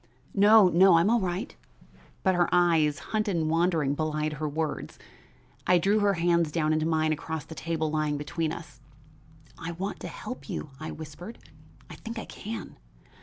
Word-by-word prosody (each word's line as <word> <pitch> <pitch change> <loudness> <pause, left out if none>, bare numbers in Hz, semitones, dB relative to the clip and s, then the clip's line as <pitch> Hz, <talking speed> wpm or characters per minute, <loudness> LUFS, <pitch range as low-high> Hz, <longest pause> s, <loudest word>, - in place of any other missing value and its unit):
"No, 210 0 +7
no; 180 +1 +6
I'm 175 +6 +3
all 235 - +4
right." 185 +4 -3 0.7
But 190 - +3
her 175 -1 +2
eyes, 165 -4 +3 0.2
hunted 215 -3 +1
and 160 -1 0
wandering, 165 -4 +2
belied 155 0 -1
her 150 0 -3
words. 155 +1 -3 0.7
I 180 - +6
drew 200 +5 +2
her 200 -1 +2
hands 170 -2 +2
down 155 -1 +1
into 155 0 +1
mine 155 -1 +2
across 160 0 -5
the - - -9
table 160 -1 -2
lying 155 -1 0
between 155 +2 -2
us. 165 0 -9 0.8
"I 165 +1 -5
want 190 +4 -4
to - - -6
help 140 -4 -8
you," 150 - -5
I 155 0 -5
whispered; 160 +8 -9 0.5
"I - - -10
think 230 +1 -7
I 225 - -5
can. 225 +2 -7
165 Hz, 170 wpm, -27 LUFS, 155-185 Hz, 0.8 s, No